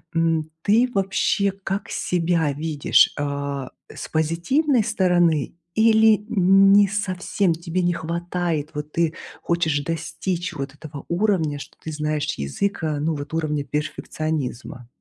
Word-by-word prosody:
м, 165 -1 +1
ты 230 +5 +4
вообще 195 0 +1
как 195 +2 -3
себя 165 -3 0
видишь? 150 0 +3
А, 140 -2 -3 0.2
с - - -8
позитивной 205 - +1
стороны 175 -8 +2 0.2
или 220 -1 +5
не 195 0 +5
совсем 190 -2 -1
тебе- 170 +2 -3
не 175 0 +2
хватает? 170 -2 -3
Вот 150 0 -6
ты 165 -1 +1 0.3
хочешь 160 -4 0
достичь 170 +3 -3
вот 135 -2 -5
этого 145 -1 -9
уровня, 170 -6 +1
что - - -11
ты 160 - -5
знаешь 150 -1 -2
язык, 160 - -2
э, 150 -2 -1
ну 155 +1 0
вот 145 +2 -7
уровня 150 -3 -1
перфекционизма? 150 -4 -4
165 Hz, 130 wpm, -23 LUFS, 150-190 Hz, 0.3 s, или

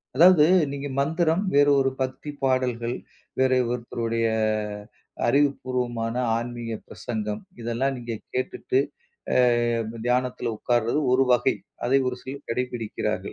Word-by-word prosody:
அதாவது 165 0 +7 0.3
நீங்க 140 0 -4
மந்திரம், 160 +5 +1
வேற 145 0 +6
ஒரு 135 0 +3
பக்தி 130 +3 -3
பாடல்கள், 125 -2 0 0.4
வேறே 130 -1 +4
ஒருத்தருடைய, 115 -1 -1 1.0
அறிவுப்பூர்வமான 125 -4 0 0.2
ஆன்மீக 120 -1 -5 0.2
பிரசங்கம், 105 -2 -4 0.2
இதெல்லாம் 120 +4 -1
நீங்க 120 -1 -5 0.2
கேட்டுட்டு 130 0 0 0.6
அ - - +3 0.7
தியானத்துல 125 0 0
உக்கார்றது 120 +4 +1
ஒரு 130 - +5
வகை. 125 +1 +4 0.3
அதை 130 +3 +3
ஒரு 125 - -3
சிலர் 140 +2 -8
கடைப்பிடிக்கிறார்கள். 120 -2 -2
125 Hz, 110 wpm, -25 LUFS, 120-135 Hz, 1.0 s, அதாவது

